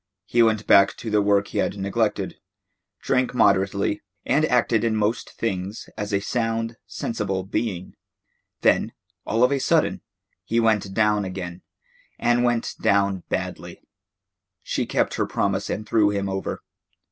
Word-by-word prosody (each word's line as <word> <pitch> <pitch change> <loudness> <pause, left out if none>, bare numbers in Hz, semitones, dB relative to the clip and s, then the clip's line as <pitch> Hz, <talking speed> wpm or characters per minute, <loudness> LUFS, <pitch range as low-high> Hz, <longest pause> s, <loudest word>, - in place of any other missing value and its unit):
He 120 - +2
went 110 -2 +3
back 100 - +5
to 110 - -5
the 105 -1 +3
work 100 0 +2
he - - -2
had 100 - -1
neglected, 105 +2 -1 0.7
drank 125 0 +1
moderately, 100 -1 +2 0.2
and 145 +4 +2
acted 120 -4 +2
in 115 -1 +1
most 110 +2 0
things 100 -1 -4
as 105 +1 -4
a 100 - +2
sound, 115 +1 -2
sensible 100 -4 -3
being. 95 -2 -3 0.7
Then, - - +2 0.3
all 115 +2 +2
of 125 - +4
a 140 - +1
sudden, - - +1 0.4
he 115 - 0
went 110 -4 +2
down 105 -1 +3
again, 90 -2 -6 0.6
and 120 0 +2
went 120 -1 0
down 100 -2 +2
badly. - - -4 0.8
She - - -2
kept - - 0
her - - 0
promise - - -1
and 110 +1 -4
threw 105 -2 +3
him 100 -1 -1
over. 95 0 -4
105 Hz, 145 wpm, -24 LUFS, 100-115 Hz, 0.8 s, back